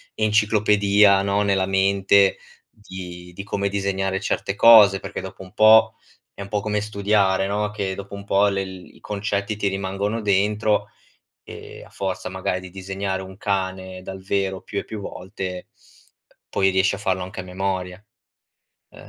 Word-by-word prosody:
enciclopedia, 105 Hz, -2 st, +3 dB
no, 100 Hz, +1 st, +1 dB
nella 100 Hz, -2 st, +1 dB
mente 95 Hz, 0 st, +3 dB, 0.3 s
di 90 Hz, -3 st, -10 dB
di 100 Hz, -, -7 dB
come 100 Hz, 0 st, -2 dB
disegnare 95 Hz, -1 st, -1 dB
certe 100 Hz, 0 st, -2 dB
cose, 105 Hz, -3 st, +7 dB
perché, -, -, -6 dB
dopo -, -, -9 dB
un 95 Hz, -, -15 dB
po', 110 Hz, +1 st, +6 dB, 0.4 s
è -, -, -10 dB
un 100 Hz, -, -7 dB
po' 105 Hz, -1 st, -1 dB
come 105 Hz, 0 st, -1 dB
studiare, 100 Hz, -2 st, +1 dB
no, 105 Hz, +1 st, -1 dB
che 100 Hz, -2 st, -3 dB
dopo 100 Hz, +1 st, -8 dB
un 100 Hz, 0 st, -9 dB
po' 100 Hz, 0 st, +3 dB
le 95 Hz, -1 st, -1 dB
i 95 Hz, -1 st, -11 dB
concetti 105 Hz, 0 st, -3 dB
ti 105 Hz, -, -1 dB
rimangono 95 Hz, +3 st, -3 dB
dentro, 105 Hz, +1 st, +1 dB, 0.5 s
e -, -, -11 dB
a -, -, -18 dB
forza 95 Hz, -1 st, -4 dB
magari 95 Hz, -1 st, -3 dB
di 95 Hz, -, -10 dB
disegnare 95 Hz, 0 st, -4 dB
un 95 Hz, 0 st, -11 dB
cane 95 Hz, -2 st, -3 dB
dal 95 Hz, 0 st, -8 dB
vero 95 Hz, -1 st, -1 dB
più 100 Hz, -, -4 dB
e -, -, -7 dB
più 110 Hz, -, -7 dB
volte, 95 Hz, -1 st, -7 dB, 0.8 s
poi 95 Hz, 0 st, +2 dB
riesci 95 Hz, +1 st, +2 dB
a 100 Hz, -, -10 dB
farlo 95 Hz, -2 st, -1 dB
anche 95 Hz, +2 st, -8 dB
a -, -, -10 dB
memoria. 95 Hz, 0 st, -4 dB, 0.9 s
Ehm -, -, -15 dB
100 Hz, 165 wpm, -22 LUFS, 95-105 Hz, 0.9 s, cose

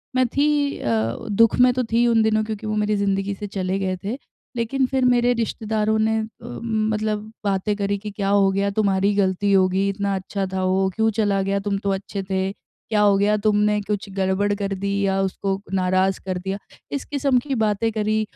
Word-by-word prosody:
मैं 255 Hz, -1 st, +3 dB
थी 285 Hz, +2 st, +1 dB
अ, 115 Hz, -1 st, 0 dB, 0.2 s
दुःख 225 Hz, +2 st, +4 dB
में 250 Hz, 0 st, +6 dB
तो 255 Hz, 0 st, 0 dB
थी 235 Hz, +1 st, +3 dB
उन 230 Hz, -1 st, +4 dB
दिनों, 215 Hz, 0 st, +2 dB
क्योंकि 215 Hz, 0 st, -5 dB
वो 215 Hz, -, -1 dB
मेरी 210 Hz, 0 st, +1 dB
ज़िंदगी 200 Hz, 0 st, 0 dB
से 205 Hz, +1 st, -6 dB
चले 190 Hz, -1 st, -2 dB
गए 185 Hz, -1 st, -1 dB
थे। 215 Hz, +6 st, -3 dB, 0.4 s
लेकिन 240 Hz, +3 st, 0 dB
फिर 260 Hz, 0 st, 0 dB
मेरे 245 Hz, 0 st, +4 dB
रिश्तेदारों 220 Hz, -2 st, -1 dB
ने 220 Hz, 0 st, +2 dB
अ, 220 Hz, -, -2 dB, 0.2 s
मतलब 215 Hz, -, -2 dB
बातें 200 Hz, +1 st, 0 dB
करी 200 Hz, 0 st, -1 dB
कि, 210 Hz, +2 st, -7 dB
"क्या 195 Hz, -1 st, -2 dB
हो 200 Hz, -1 st, +4 dB
गया? 200 Hz, +1 st, 0 dB
तुम्हारी 195 Hz, -2 st, +2 dB
ही 205 Hz, -, 0 dB
गलती 200 Hz, 0 st, +1 dB
होगी। 190 Hz, 0 st, +3 dB
इतना 200 Hz, 0 st, -1 dB
अच्छा 195 Hz, +1 st, -3 dB
था 190 Hz, 0 st, -1 dB
वो, 190 Hz, +1 st, +2 dB
क्यों 225 Hz, 0 st, +2 dB
चला 200 Hz, -2 st, +2 dB
गया? 195 Hz, +1 st, 0 dB
तुम 200 Hz, -1 st, +1 dB
तो 200 Hz, -, 0 dB
अच्छे 195 Hz, 0 st, -4 dB
थे। 190 Hz, 0 st, 0 dB
क्या 210 Hz, 0 st, -4 dB
हो 205 Hz, -1 st, +5 dB
गया? 205 Hz, +1 st, +3 dB
तुमने 210 Hz, -1 st, +3 dB
कुछ 205 Hz, 0 st, -3 dB
गड़बड़ 195 Hz, +1 st, +1 dB
कर 200 Hz, -1 st, -3 dB
दी 200 Hz, +1 st, -3 dB
या 195 Hz, 0 st, +1 dB
उसको 195 Hz, 0 st, -2 dB
नाराज़ 185 Hz, 0 st, +1 dB
कर 185 Hz, -1 st, -2 dB
दिया?" 190 Hz, +2 st, -3 dB, 0.3 s
इस 280 Hz, -, -3 dB
किस्म 280 Hz, -2 st, +1 dB
की 275 Hz, -2 st, -1 dB
बातें 215 Hz, +1 st, +1 dB
करी 215 Hz, 0 st, 0 dB
205 Hz, 205 wpm, -22 LUFS, 195-220 Hz, 0.4 s, में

